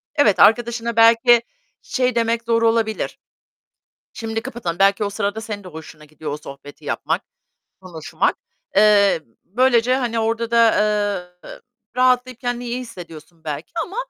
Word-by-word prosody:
Evet 225 Hz, -10 st, +3 dB
arkadaşına 235 Hz, 0 st, +3 dB
belki 230 Hz, +1 st, +5 dB, 0.4 s
şey 250 Hz, -2 st, -1 dB
demek 230 Hz, 0 st, 0 dB
zor 230 Hz, 0 st, +1 dB
olabilir. 225 Hz, -1 st, 0 dB, 0.9 s
Şimdi 225 Hz, -1 st, -4 dB
kapatalım. 175 Hz, -8 st, -5 dB
Belki 195 Hz, +1 st, +3 dB
o 200 Hz, -, -2 dB
sırada 205 Hz, +1 st, -3 dB
senin 210 Hz, -3 st, -7 dB
de -, -, -9 dB
hoşuna 155 Hz, -1 st, -11 dB
gidiyor 155 Hz, 0 st, -7 dB
o -, -, -3 dB
sohbeti 145 Hz, -1 st, -12 dB
yapmak, -, -, -2 dB, 0.6 s
konuşmak. 175 Hz, -4 st, -2 dB, 0.4 s
Eee, 205 Hz, -4 st, +5 dB, 0.2 s
böylece, 245 Hz, +3 st, +2 dB
hani, 235 Hz, -3 st, -2 dB
orada 230 Hz, +1 st, -1 dB
da, 230 Hz, -1 st, +5 dB, 0.8 s
eee, -, -, -10 dB, 0.4 s
rahatlayıp 255 Hz, -1 st, +2 dB
kendini 245 Hz, -1 st, -3 dB
iyi 240 Hz, +1 st, -3 dB
hissediyorsun 170 Hz, -8 st, -12 dB
belki 150 Hz, 0 st, -6 dB
ama, 390 Hz, -, -11 dB
225 Hz, 135 wpm, -20 LUFS, 185-235 Hz, 0.9 s, belki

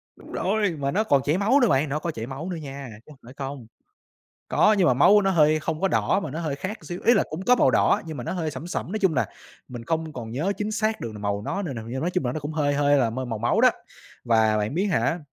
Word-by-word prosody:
Đúng -, -, -15 dB
rồi, 205 Hz, 0 st, 0 dB
mà 140 Hz, 0 st, -1 dB
nó 210 Hz, +7 st, +1 dB
còn 140 Hz, -10 st, +3 dB
chảy 150 Hz, +4 st, +1 dB
máu 220 Hz, +8 st, +3 dB
nữa 245 Hz, -, +4 dB
bạn, 140 Hz, -1 st, +2 dB
nó 150 Hz, -, -1 dB
có 170 Hz, +2 st, -3 dB
chảy 115 Hz, -5 st, -6 dB
máu 140 Hz, +7 st, -6 dB
nữa 180 Hz, -, -3 dB
nha, 140 Hz, -3 st, -8 dB, 0.2 s
chứ -, -, -19 dB
không 140 Hz, -, -16 dB
phải 125 Hz, -, -12 dB
không. 135 Hz, -4 st, -6 dB, 0.8 s
Có, 215 Hz, -, +4 dB
nhưng 185 Hz, -, +4 dB
mà 125 Hz, -, +4 dB
máu 195 Hz, +11 st, +6 dB
nó 195 Hz, -, +2 dB
hơi 155 Hz, -3 st, +3 dB
không 155 Hz, 0 st, -3 dB
có 195 Hz, -, +2 dB
đỏ 195 Hz, -, +1 dB
mà 160 Hz, -, -5 dB
nó 155 Hz, +5 st, -5 dB
hơi 155 Hz, -4 st, -3 dB
khác 190 Hz, +9 st, -5 dB
xíu, 175 Hz, 0 st, -6 dB
ý 235 Hz, -, +6 dB
là 205 Hz, -, +3 dB
cũng 155 Hz, +4 st, -5 dB
có 250 Hz, -, +5 dB
màu -, -, +4 dB
đỏ -, -, +3 dB
nhưng 160 Hz, -2 st, -6 dB
mà 120 Hz, -, -6 dB
nó -, -, -3 dB
hơi 165 Hz, -4 st, -2 dB
sẫm 150 Hz, +2 st, -7 dB
sẫm, 175 Hz, 0 st, -4 dB
nói 215 Hz, -, -1 dB
chung 190 Hz, -6 st, +2 dB
là -, -, +1 dB, 0.4 s
mình 120 Hz, -2 st, -8 dB
không 160 Hz, +3 st, -2 dB
còn 115 Hz, -5 st, -7 dB
nhớ 155 Hz, -, -1 dB
chính 210 Hz, +1 st, -3 dB
xác 215 Hz, 0 st, -1 dB
được 115 Hz, -, -5 dB
màu 100 Hz, -1 st, -3 dB
nó 195 Hz, -, -3 dB
n 155 Hz, -8 st, -4 dB
nào 110 Hz, -2 st, -7 dB
nhưng 130 Hz, +3 st, -4 dB
nói 170 Hz, -, -1 dB
chung 180 Hz, -5 st, -1 dB
là 120 Hz, -, -1 dB
nó 155 Hz, -, -4 dB
cũng 145 Hz, +2 st, -5 dB
hơi 145 Hz, -2 st, 0 dB
hơi 145 Hz, 0 st, +3 dB
là 120 Hz, -4 st, +2 dB
mơi 130 Hz, +3 st, -4 dB
màu 115 Hz, -3 st, -4 dB
máu 115 Hz, +2 st, +1 dB
đó. -, -, +7 dB, 0.5 s
Và 110 Hz, -2 st, +3 dB
bạn 105 Hz, +4 st, -2 dB
biết 185 Hz, +4 st, +1 dB
hả, 175 Hz, -3 st, +1 dB
155 Hz, 300 wpm, -24 LUFS, 130-185 Hz, 0.8 s, đó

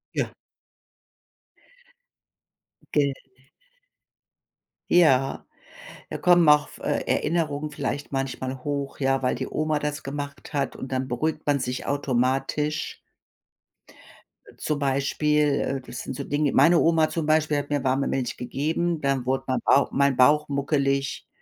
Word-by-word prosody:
Ja. -, -, -1 dB, 2.6 s
Ge 140 Hz, -2 st, +2 dB, 1.8 s
Ja, 135 Hz, -6 st, +3 dB, 0.6 s
da -, -, -4 dB
kommen 175 Hz, -2 st, +5 dB
auf 150 Hz, 0 st, +3 dB
f -, -, -12 dB
äh, -, -, 0 dB
Erinnerungen 150 Hz, -2 st, -1 dB
vielleicht 145 Hz, -1 st, -4 dB
manchmal 130 Hz, -1 st, -3 dB
hoch, 140 Hz, -1 st, -3 dB
ja, 135 Hz, 0 st, +1 dB
weil 125 Hz, -, +1 dB
die 130 Hz, +1 st, -4 dB
Oma 155 Hz, -1 st, 0 dB
das 150 Hz, 0 st, -3 dB
gemacht 140 Hz, +1 st, -6 dB
hat, 140 Hz, -2 st, -1 dB
und 130 Hz, -, -8 dB
dann 130 Hz, 0 st, -1 dB
beruhigt 155 Hz, +6 st, -2 dB
man 145 Hz, -1 st, +2 dB
sich 125 Hz, +1 st, -3 dB
automatisch. 140 Hz, +3 st, -1 dB, 1.5 s
Äh, -, -, -16 dB
zum 150 Hz, -2 st, -2 dB
Beispiel, 145 Hz, +1 st, +1 dB
äh, 135 Hz, -1 st, -2 dB
das 125 Hz, -1 st, -9 dB
sind -, -, -6 dB
so -, -, -4 dB
Dinge 145 Hz, 0 st, 0 dB
meine 165 Hz, +5 st, +5 dB
Oma, 160 Hz, -1 st, +3 dB
zum 165 Hz, -2 st, -2 dB
Beispiel, 155 Hz, -1 st, +2 dB
hat 145 Hz, 0 st, -3 dB
mir 145 Hz, -2 st, -1 dB
warme 135 Hz, +1 st, +1 dB
Milch 125 Hz, -2 st, -2 dB
gegeben, 155 Hz, +6 st, -2 dB
dann 135 Hz, -2 st, 0 dB
wurde 130 Hz, +1 st, 0 dB
ma 130 Hz, -, 0 dB
Bauch 140 Hz, -, +4 dB
mein 140 Hz, -1 st, +2 dB
Bauch 150 Hz, +4 st, +4 dB
muckelig. 140 Hz, -1 st, -1 dB
140 Hz, 135 wpm, -25 LUFS, 135-150 Hz, 2.6 s, kommen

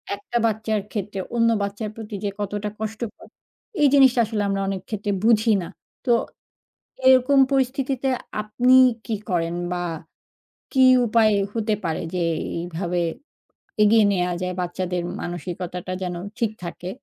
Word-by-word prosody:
একটা 205 Hz, +4 st, -4 dB
বাচ্চার 220 Hz, -1 st, 0 dB
ক্ষেত্রে 205 Hz, -1 st, -4 dB, 0.2 s
অন্য 230 Hz, -1 st, +4 dB
বাচ্চার 205 Hz, +2 st, -3 dB
প্রতি 220 Hz, -2 st, -7 dB
যে, 205 Hz, -, 0 dB
কতটা 205 Hz, +1 st, -3 dB
কষ্টকর, 220 Hz, +1 st, -6 dB, 0.5 s
এই 295 Hz, -, +7 dB
জিনিসটা 265 Hz, -3 st, +6 dB
আসলে 215 Hz, -1 st, -2 dB
আমরা 195 Hz, 0 st, 0 dB
অনেকক্ষেত্রে 195 Hz, +2 st, -3 dB
বুঝি 225 Hz, 0 st, +4 dB
না। 170 Hz, -, -6 dB, 0.4 s
তো 250 Hz, -, +2 dB, 0.9 s
এরকম 260 Hz, +1 st, +6 dB
পরিস্থিতিতে 270 Hz, 0 st, 0 dB, 0.3 s
আপনি 240 Hz, +4 st, +2 dB, 0.3 s
কি 225 Hz, -, -2 dB
করেন? 170 Hz, -2 st, 0 dB, 0.2 s
বা, 180 Hz, -, -2 dB, 0.9 s
কি 265 Hz, -, +3 dB, 0.2 s
উপায় 220 Hz, -1 st, +4 dB, 0.2 s
হতে 220 Hz, -1 st, 0 dB
পারে 160 Hz, -1 st, -1 dB
যে, 180 Hz, -, 0 dB, 0.4 s
এইভাবে 175 Hz, +1 st, -3 dB, 0.8 s
এগিয়ে 215 Hz, +1 st, +5 dB
নেয়া 180 Hz, -2 st, 0 dB
যায়? 180 Hz, 0 st, -2 dB
বাচ্চাদের 180 Hz, 0 st, -2 dB, 0.2 s
মানসিকতাটা 175 Hz, +1 st, -5 dB
যেন 180 Hz, -1 st, -3 dB, 0.2 s
ঠিক 230 Hz, -3 st, +1 dB
থাকে। 175 Hz, +1 st, -6 dB
210 Hz, 130 wpm, -23 LUFS, 180-230 Hz, 0.9 s, এই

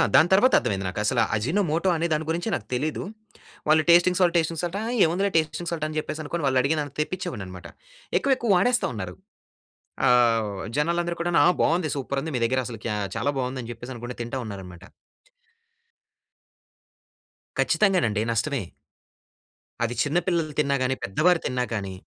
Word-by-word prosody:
దాని 160 Hz, -, +6 dB
తర్వాతర్థమైయింది 125 Hz, -, +3 dB
నాకు. 95 Hz, -, -5 dB
అసలా 120 Hz, +2 st, +2 dB
అజినోమోటో 165 Hz, -, 0 dB
అనే 165 Hz, +1 st, 0 dB
దాని 155 Hz, +1 st, -1 dB
గురించే 170 Hz, +6 st, -1 dB
నాకు 110 Hz, -7 st, -7 dB
తెలీదు. 150 Hz, +5 st, -1 dB, 0.6 s
వాళ్ళు 155 Hz, +1 st, +5 dB
టేస్టింగ్ 175 Hz, +1 st, +6 dB
సాల్ట్, 175 Hz, -2 st, +3 dB
టేస్టింగ్ 165 Hz, -1 st, 0 dB
సాల్ట్, 175 Hz, +2 st, -2 dB
"ఆ! -, -, -3 dB, 0.2 s
ఏముందిలే 185 Hz, +5 st, +1 dB
టేస్టింగ్ 160 Hz, +2 st, -1 dB
సాల్ట్" 160 Hz, -2 st, -2 dB
అని 155 Hz, 0 st, -5 dB
చెప్పేసి 155 Hz, 0 st, -5 dB
అనుకోని 165 Hz, +2 st, -4 dB
వాళ్ళు 130 Hz, -1 st, +3 dB
అడిగినంత 145 Hz, 0 st, -1 dB
తెప్పించేవాడినన్నమాట. 105 Hz, -, -5 dB, 0.5 s
ఎక్కువెక్కువ 265 Hz, -4 st, 0 dB
వాడేస్తా 245 Hz, +7 st, +2 dB
ఉన్నారు. 95 Hz, -5 st, -6 dB, 0.9 s
ఆహ్, 115 Hz, -3 st, +4 dB, 0.3 s
జనాలందరూ 170 Hz, +2 st, 0 dB
కూడాను, 170 Hz, -2 st, +2 dB
"ఆ! -, -, +7 dB
బావుంది. 165 Hz, -1 st, +1 dB
సూపర్ 140 Hz, 0 st, -2 dB
ఉంది. 160 Hz, +1 st, -5 dB
మీ -, -, -2 dB
దగ్గర 130 Hz, +2 st, +1 dB
అసలు 115 Hz, -3 st, -8 dB
క్యా 105 Hz, -2 st, -1 dB, 0.2 s
చాలా 140 Hz, +4 st, 0 dB
బాగుంది" 130 Hz, 0 st, -2 dB
అని 115 Hz, -, -8 dB
చెప్పేసనుకుంటా 120 Hz, +1 st, -8 dB
తింటా 120 Hz, +3 st, -4 dB
ఉన్నారన్నమాట. 95 Hz, -4 st, -9 dB, 2.7 s
ఖచ్చితంగానండి 155 Hz, -, +2 dB
నష్టమే. 135 Hz, +2 st, -1 dB, 1.2 s
అది 120 Hz, +1 st, -1 dB
చిన్న 150 Hz, +3 st, 0 dB
పిల్లలు 165 Hz, -4 st, 0 dB
తిన్నా 140 Hz, -2 st, +2 dB
గాని, 130 Hz, +1 st, 0 dB
పెద్దవారు 165 Hz, -, +2 dB
తిన్నా 125 Hz, 0 st, -1 dB
గాని 100 Hz, -3 st, -3 dB
150 Hz, 150 wpm, -25 LUFS, 120-170 Hz, 2.7 s, ఆ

